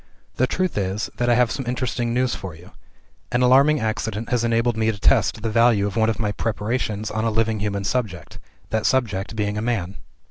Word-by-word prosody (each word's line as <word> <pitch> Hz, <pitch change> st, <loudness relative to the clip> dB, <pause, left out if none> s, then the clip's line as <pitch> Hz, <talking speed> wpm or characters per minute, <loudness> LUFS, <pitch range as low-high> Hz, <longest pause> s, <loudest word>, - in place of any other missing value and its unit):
The 130 Hz, -, +3 dB
truth 185 Hz, -, -1 dB
is, 95 Hz, +2 st, -2 dB
that 120 Hz, 0 st, +1 dB
I 120 Hz, -, +5 dB
have 120 Hz, -1 st, +3 dB
some 135 Hz, -3 st, -4 dB
interesting 120 Hz, -1 st, -1 dB
news 125 Hz, +1 st, +1 dB
for 95 Hz, -4 st, -6 dB
you. 85 Hz, +3 st, -15 dB, 0.6 s
An 125 Hz, +1 st, +2 dB
alarming 140 Hz, +4 st, +5 dB
accident 110 Hz, 0 st, -3 dB
has 125 Hz, -2 st, +1 dB
enabled 115 Hz, 0 st, +1 dB
me 110 Hz, 0 st, +1 dB
to 105 Hz, -, -8 dB
test 110 Hz, -1 st, +2 dB
the 115 Hz, -, 0 dB
value 115 Hz, -2 st, +4 dB
of 100 Hz, -1 st, -3 dB
one 110 Hz, -1 st, +3 dB
of 110 Hz, -, -1 dB
my 105 Hz, -3 st, -1 dB
preparations 110 Hz, 0 st, -2 dB
on 110 Hz, +1 st, -2 dB
a 115 Hz, -, +2 dB
living 110 Hz, 0 st, 0 dB
human 100 Hz, -1 st, -2 dB
subject 95 Hz, -7 st, -3 dB, 0.3 s
that 110 Hz, -1 st, +1 dB
subject 110 Hz, -5 st, 0 dB
being 105 Hz, -1 st, -1 dB
a -, -, -3 dB
man. 100 Hz, -5 st, -2 dB
110 Hz, 210 wpm, -22 LUFS, 105-120 Hz, 0.6 s, I